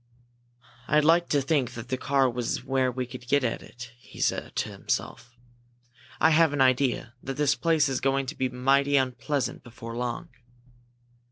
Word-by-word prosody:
"I'd 150 0 +3
like 170 +2 +4
to 145 -2 +2
think 135 -3 0
that 120 +1 -8
that 130 -1 -2
car 135 -1 +2
was 120 -1 -2
where 130 -1 +1
we 125 +1 -3
could 125 0 -10
get 140 +1 +2
at 115 - -1
it," 120 0 -11
he - - -15
said - - -1
to - - -1
himself. 120 0 -4 0.8
"I 160 - +5
have 160 -1 +4
an 145 - -2
idea 130 -2 +2
that 135 0 -5
this 145 -1 +3
place 160 -1 +2
is 135 -2 -2
going 135 +1 +1
to 130 - -6
be 130 -1 -1
mighty 135 +3 +2
unpleasant 130 +1 -1
before 115 -1 -9
long." 125 +7 -4
130 Hz, 175 wpm, -27 LUFS, 125-145 Hz, 0.8 s, I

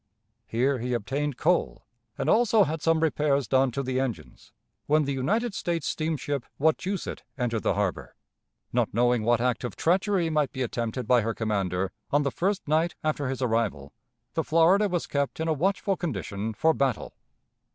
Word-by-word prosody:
Here 130 +3 +1
he 125 +1 -1
obtained 135 +4 -2
coal, 175 +3 0 0.3
and - - -2
also 225 -2 +5
had 160 -2 -3
some 165 -1 +2
repairs 145 -4 +1
done 130 +2 +3
to 140 +3 -3
the 130 0 -1
engines, 130 -4 -5 0.4
when 155 +1 +4
the 140 - -1
United 215 - 0
States 170 -5 -2
steamship 150 -4 -2
Wachusett 170 +6 -1 0.2
entered 120 -4 -1
the - - +1
harbor. 100 -3 -2 0.6
Not - - 0
knowing 120 0 +3
what 120 +1 +2
act 125 0 0
of 120 - -4
treachery 185 0 +1
might 150 -3 +1
be 130 - -2
attempted 120 0 -3
by 125 -2 +5
her 115 +1 -2
commander 95 -4 -1 0.2
on 145 +1 +2
the 140 - 0
first 195 +6 -1
night 160 +3 +1
after 150 -3 -1
his 135 0 -3
arrival, 110 - -1 0.4
the - - 0
Florida 180 +6 +4
was 175 -2 -1
kept 140 +1 -2
in 160 - -1
a 160 - +2
watchful 195 +5 0
condition 110 - -4
for 160 +8 +3
battle. 135 -5 -1
140 Hz, 170 wpm, -27 LUFS, 120-165 Hz, 0.6 s, also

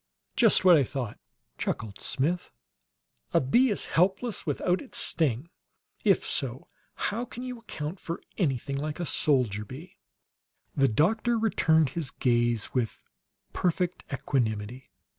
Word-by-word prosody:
"Just 225 -5 +5
what 180 -2 +9
I 140 - +4
thought!" 125 -4 -4 0.4
chuckled 105 -3 -3
Smith. 165 +7 0 0.9
"A - - +7
bee 240 - +4
is 205 - -1
helpless 190 +4 +1
without 175 +5 +1
its 270 - -7
sting! 150 +1 0 0.5
If - - +3
so, - - -2 0.3
how 225 +4 -1
can 245 0 -7
you 250 -2 -5
account 170 -5 -6
for 170 - -5 0.2
anything 140 - -1
like 150 +3 -3
a 175 - -1
soldier 125 -11 +1
bee?" 135 - -11 0.8
The 135 -1 +4
doctor 220 - +2
returned 160 -9 +3
his 160 -3 -3
gaze 120 -3 +1
with 120 -4 -1 0.5
perfect 180 0 0
equanimity. 120 -3 -2
155 Hz, 130 wpm, -28 LUFS, 130-185 Hz, 0.9 s, what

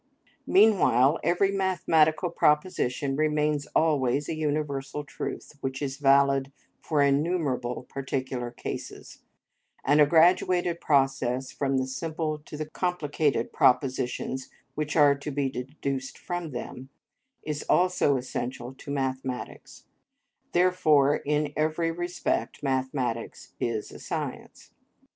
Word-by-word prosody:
Meanwhile 170 - +4
every 185 +3 +2
mathematical 175 -3 +2
proposition 150 -4 +1
remains 150 -1 +1
always 145 -3 +2
a - - -2
universal 150 -2 -2
truth, 145 - -6
which 135 0 -3
is 140 -2 -3
valid 140 -1 +3 0.3
for 150 -2 +1
innumerable 140 -4 0
particular 130 -2 -3
cases; 120 - -7 0.7
and 145 +2 +5
a 145 - +6
graduated 175 +1 +3
process 135 -3 +1
from 135 -1 -1
the 130 - 0
simple 155 +3 -3
to 150 0 -10
the 155 - -3
complicated 155 -7 -1
propositions 130 0 +1 0.2
which 150 -1 -3
are 145 -3 +6
to 140 +2 -6
be 140 -1 -1
deduced 135 +1 -4
from 175 -2 -4
them, 130 0 -7 0.5
is 150 -1 -3
also 180 -6 +3
essential 125 0 -5
to 135 - -12
mathematics; 130 -2 -4 0.7
therefore, 160 -6 +4
in 150 0 -1
every 155 +2 0
respect 175 -2 -3
mathematics 130 -3 -2
is 115 -3 -2
a - - -11
science. - - -6
145 Hz, 110 wpm, -27 LUFS, 130-155 Hz, 0.7 s, a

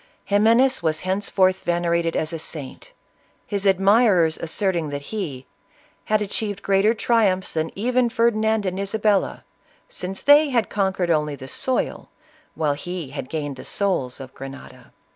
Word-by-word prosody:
Ximenes 230 +5 +4
was 160 -2 0
henceforth 190 0 +1
venerated 170 -1 0
as 160 +1 -2
a 165 - -4
saint, 155 - -8 0.5
his 200 -1 -1
admirers 195 -3 +4
asserting 170 -1 -1
that 145 0 -5
he 145 -12 -4 0.6
"had 215 0 +1
achieved 205 -1 -4
greater 200 +3 +3
tri 230 -1 +3
umphs 185 0 -2
than 160 0 -1
even 245 +3 +1
Ferdinand 220 -2 +1
and 185 0 -2
Isabella, 205 0 0 0.4
since 190 +1 -5
they 290 +1 +6
had 235 -4 0
conquered 190 -3 0
only 150 -2 0
the 130 -1 -10
soil, 255 - -2 0.5
while 150 -2 +1
he 165 -1 -6
had 140 -2 -6
gained 145 -4 -4
the - - -9
souls 180 -12 -1
of 130 -1 -10
Grenada." 135 0 -11
190 Hz, 145 wpm, -22 LUFS, 160-215 Hz, 0.6 s, they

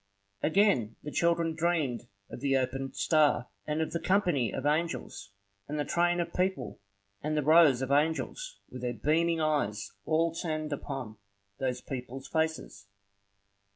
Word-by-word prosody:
Again 155 - +3
the 150 - -5
child 170 +2 +2 0.2
dreamed 155 -8 0 0.2
of - - -7
the 135 0 +2
opened 135 +1 -2
star, 150 -6 +3 0.2
and 155 +1 0
of - - -5
the 170 - -1
company 175 - +2
of 135 - -4
angels, 150 -9 -1 0.4
and 150 - -3
the 145 - 0
train 175 0 +2
of 170 - -2
people, 185 +1 -1 0.4
and 155 +1 -1
the 150 - +1
rows 150 -4 +6
of 130 - -3
angels 160 - 0
with 125 - -7
their 120 -1 -2
beaming 165 +6 +2
eyes 110 -10 0
all 165 +1 +2
turned 155 -2 -3
upon 135 -6 -5 0.4
those 130 -2 -1
people's 130 0 -6
faces. 160 -11 -2
150 Hz, 150 wpm, -30 LUFS, 130-165 Hz, 0.4 s, rows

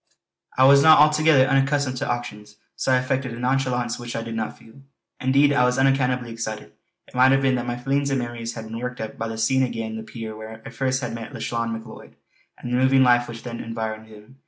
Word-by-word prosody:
I 130 - +5
was 140 +1 +7
not 155 +2 +7
altogether 150 -2 +5
unaccustomed 135 -1 +1
to - - -3
auctions, 105 -3 -5 0.2
so - - -1
I - - +5
affected 130 -1 -2
a - - -9
nonchalance 125 -2 -1
which 120 0 -7
I 115 - -3
did 115 0 -6
not 110 -1 -4
feel. 115 +5 -17 0.4
Indeed, 140 +2 +3
I 125 - +3
was 125 0 +2
unaccountably 130 -2 +1
excited. 110 -2 -6 0.4
It - - -20
might 130 +1 +5
have 135 0 +3
been 135 -1 +3
that 120 -1 -2
my 120 0 -3
feelings 140 +3 -1
and 135 - 0
memories 120 -2 -5
had 115 -1 -7
been 115 +1 -6
worked 125 +1 -5
up 110 -1 -6
by 115 - -2
the 110 0 -6
seeing 130 +4 +2
again 115 -3 -3
the - - -5
pier 110 -1 -8
where 110 +1 -9
first 130 0 -1
I - - -1
had - - -7
met 115 -1 -8
Lauchlane 115 -1 -3
Macleod, 110 0 -9 0.4
and 120 - -7
the - - +2
moving 130 +1 +4
life 120 -1 +4
which 115 -1 -9
then 120 -1 -6
had - - -7
environed 110 -1 -5
him. 110 +5 -16
125 Hz, 235 wpm, -23 LUFS, 115-135 Hz, 0.4 s, was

